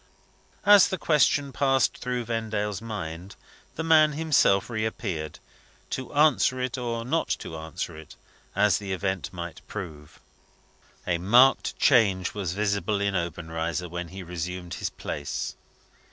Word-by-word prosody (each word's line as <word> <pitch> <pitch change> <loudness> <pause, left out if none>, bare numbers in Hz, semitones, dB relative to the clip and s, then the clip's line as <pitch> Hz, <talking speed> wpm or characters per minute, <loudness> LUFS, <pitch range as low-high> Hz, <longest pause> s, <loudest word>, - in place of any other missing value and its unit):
As 205 -1 +8
the 190 - -3
question 145 -3 +2
passed 135 -2 +2
through 125 -1 -2
Vendale's 110 -3 -2
mind, 95 -4 -6 0.4
the 160 - -3
man 155 -2 +5
himself 145 -11 +3
reappeared 110 -9 -3 0.5
to 130 - -4
answer 145 -3 +4
it, 125 0 -2
or 115 -2 -3
not 160 +6 0
to 80 - -8
answer 80 +2 -5
it, 80 0 -12 0.4
as 105 +1 +3
the 100 -2 -4
event 95 0 -2
might 85 -2 -7
prove. 80 -8 -8 0.9
A 85 -2 0
marked 120 +9 +4
change 100 -9 +3
was 95 -4 -3
visible 100 +1 0
in 100 -1 0
Obenreizer 85 0 -3
when 90 +1 -5
he 95 +2 -8
resumed 90 0 -5
his - - -3
place. - - -5
100 Hz, 135 wpm, -26 LUFS, 90-125 Hz, 0.9 s, As